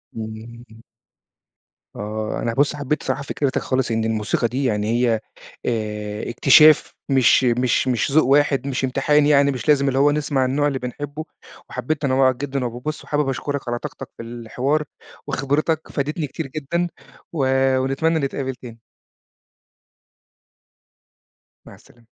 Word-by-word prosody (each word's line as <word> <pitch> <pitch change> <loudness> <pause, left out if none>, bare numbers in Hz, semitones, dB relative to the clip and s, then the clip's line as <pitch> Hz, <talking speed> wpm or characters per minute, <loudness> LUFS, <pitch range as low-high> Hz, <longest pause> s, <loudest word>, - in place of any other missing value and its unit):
امم. 110 +1 -9 1.1
آه، 110 +1 -4
أنا 115 - -1
بُصّ 145 +4 +2
حبيت 145 +1 -2
الصراحة 135 +1 -2
فكرتك 140 -1 -1
خالص 130 -2 -1
إن 110 0 0
الموسيقى 110 +1 0
دي 130 +4 -3
يعني 105 -4 0
هي 120 -1 +2 0.5
آآ، 105 -2 -3
اكتشاف 150 +5 +6 0.2
مش 135 -1 +4
مش 125 +1 +2
مش 130 +3 0
ذوق 155 +2 +5
واحد، 140 0 +3
مش 135 -1 -2
امتحان 145 +3 +2
يعني، 140 -1 +4
مش 125 -4 -6
لازم 140 -2 +4
اللي 135 0 +1
هو 145 +1 +5
نسمع 145 -3 0
النوع 145 +3 +1
اللي 135 -2 -2
بنحبه، 145 +5 -6 0.5
وحبيت 155 +4 -3
تنوُّعك 130 -2 +3
جدًا 135 -1 -3
وب 120 +1 -6
بُصّ، 155 0 -4
وحابب 145 -2 0
أشكرك 140 0 -3
على 120 0 -2
طاقتك - - -8
في 115 - -7
الحوار 120 +6 -2 0.4
وخبرتك 145 +4 0
فادتني 150 +2 -2
كتير 150 +1 -5
جدًا، 155 +5 -2 0.5
و 150 -5 0 0.4
ونتمنى 150 +5 +1
نتقابل 135 -2 -3
تاني. 120 -2 -12 2.9
مع - - -12
السلامة. 120 -1 -22
135 Hz, 140 wpm, -21 LUFS, 120-145 Hz, 2.9 s, اكتشاف